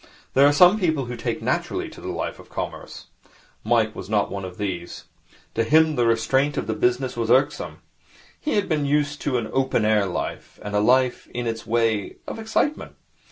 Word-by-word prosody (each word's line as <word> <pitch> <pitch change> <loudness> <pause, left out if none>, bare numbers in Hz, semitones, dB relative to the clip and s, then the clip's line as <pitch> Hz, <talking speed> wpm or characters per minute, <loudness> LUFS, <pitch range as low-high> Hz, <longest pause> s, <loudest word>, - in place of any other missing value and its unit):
There 140 +2 +6
are - - +5
some 180 +8 +6
people 160 -8 +1
who 120 +1 -5
take 115 - -3
naturally - - -1
to - - -13
a - - -6
life - - -4
of - - -15
commerce. - - -6 0.6
Mike 110 -1 +2
was 95 - -8
not 105 -2 +1
of 90 -1 -8
these. 90 -4 -4 0.5
To 115 - +1
him 155 +5 +4
the 120 -3 +2
restraint 130 +5 +1
of - - -1
the 110 - -1
business 125 +3 0
was 115 -1 -2
irksome. 135 +4 +1 0.6
He 300 - -1
had 205 -1 +1
been 150 -4 0
used 145 0 0
to 135 -4 0
an 115 -2 -2
open 130 -4 +1
air 105 -2 +3
life, 90 - -5
and 105 0 -4
a - - +4
life, 125 +3 +2
in 120 0 -2
its 115 -1 -4
way, 115 -3 0
of - - -5
excitement. 225 +7 -1
125 Hz, 195 wpm, -23 LUFS, 110-145 Hz, 0.6 s, There